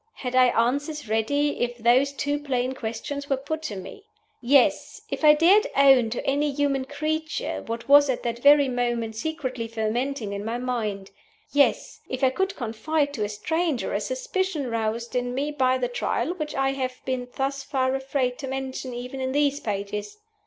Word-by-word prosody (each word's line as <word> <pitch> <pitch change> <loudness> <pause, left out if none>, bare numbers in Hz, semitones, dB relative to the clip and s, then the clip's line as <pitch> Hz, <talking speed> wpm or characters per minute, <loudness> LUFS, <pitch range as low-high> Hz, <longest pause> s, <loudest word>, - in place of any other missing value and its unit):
Had 250 -1 -5
I 255 0 +7
answers 285 +4 -1
ready 285 +7 0
if 245 0 -1
those 245 +4 +3
two 285 +1 -2
plain 260 -3 -1
questions 260 +4 -5
were 270 - +2
put 310 +4 -4
to 225 -10 -5
me? 195 - -9 0.4
Yes! 260 +1 +2
if - - -4
I 300 0 +8
dared 365 +7 +5
own 270 -4 +6
to 235 - -4
any 290 +2 +1
human 275 -1 0
creature 310 +3 -3
what 230 +1 -5
was 285 0 +7
at 255 - -1
that 235 0 -2
very 285 +1 +6
moment 240 -3 -1
secretly 255 -3 -3
fermenting 225 +1 -2
in 200 0 -4
my 225 +2 -2
mind. 220 -6 -3 0.4
Yes! 285 -1 +2
if 260 +1 -4
I 260 - +5
could 385 +7 -1
confide 285 +5 -1
to 220 - -2
a 205 - -2
stranger 320 +6 -1
a - - 0
suspicion 380 - -2
roused 230 +1 -2
in 245 0 -1
me 285 +3 -1
by 260 -3 +2
the 250 -1 -1
Trial 245 +7 -1
which 305 -4 -5
I 270 -1 +1
have 255 -2 -3
been 255 -2 -2
thus 275 +1 -1
far 260 -2 0
afraid 265 -2 -1
to 275 - -5
mention 265 -1 -4
even 250 +2 -6
in 260 0 -2
these 285 0 +2
pages! 205 - -4
265 Hz, 180 wpm, -25 LUFS, 240-285 Hz, 0.4 s, I